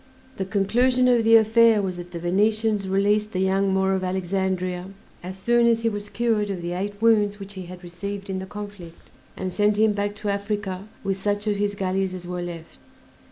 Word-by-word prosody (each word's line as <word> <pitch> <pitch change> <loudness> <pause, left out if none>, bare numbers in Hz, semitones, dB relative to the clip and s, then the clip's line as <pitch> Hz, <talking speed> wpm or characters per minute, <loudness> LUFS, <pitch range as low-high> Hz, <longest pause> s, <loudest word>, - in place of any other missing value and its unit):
The 190 - -2
conclusion 245 +6 +2
of 240 -2 +4
the 225 +1 +6
affair 225 0 +5
was 185 -3 -2
that 175 0 -8
the 175 - -7
Venetians 210 +4 +1
released 205 +2 +1
"The 185 - -1
Young 190 +1 +2
Moor 190 0 +2
of 190 -1 -1
Alexandria" 185 -1 -2 0.3
as 185 +2 -7
soon 235 +4 +3
as 230 -1 +3
he 230 - +2
was 205 -1 -5
cured 215 -1 0
of 185 -3 -4
the 175 - -3
eight 200 +3 -4
wounds 210 -2 +3
which 200 0 -8
he 185 -2 -8
had 180 0 -10
received 195 +3 -6
in 190 -1 -3
the 190 - -7
conflict, 205 -5 -10 0.3
and 185 -1 -3
sent 205 +2 +2
him 215 0 +4
back 205 0 -2
to 210 0 -4
Africa 200 -1 -3 0.2
with 195 -1 -2
such 205 +1 -1
of 210 -1 0
his 205 0 -1
galleys 190 -1 -1
as 180 -1 -8
were 180 0 -4
left. 170 -2 -8
200 Hz, 205 wpm, -24 LUFS, 185-210 Hz, 0.3 s, the